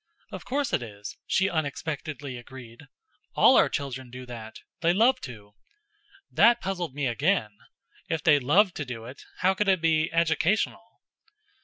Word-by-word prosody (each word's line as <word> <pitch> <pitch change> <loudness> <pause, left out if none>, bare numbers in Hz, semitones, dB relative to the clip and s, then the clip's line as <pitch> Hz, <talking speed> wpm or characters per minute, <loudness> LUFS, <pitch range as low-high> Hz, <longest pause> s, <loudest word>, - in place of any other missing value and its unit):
"Of - - -8
course 275 -1 -2
it - - +2
is," 105 -3 -8
she 190 - +2
unexpectedly 150 -3 -4
agreed. 120 +1 -12 0.5
"All - - +6
our - - +5
children 130 -3 -4
do 125 +1 -9
that 115 -3 -9 0.2
they 170 0 +2
love 245 +6 +3
to." 105 -5 -10 0.8
That 235 +3 +5
puzzled 180 - -4
me 145 -1 -2
again. 130 - +1 0.6
If 160 -1 -2
they 150 -3 +5
loved 180 +9 +3
to 145 - -2
do 115 -3 -7
it, 130 +4 -10 0.2
how 190 +1 +4
could 205 +2 -1
it 190 -2 +3
be 160 0 +1
educational? 170 +7 0
150 Hz, 155 wpm, -26 LUFS, 125-190 Hz, 0.8 s, All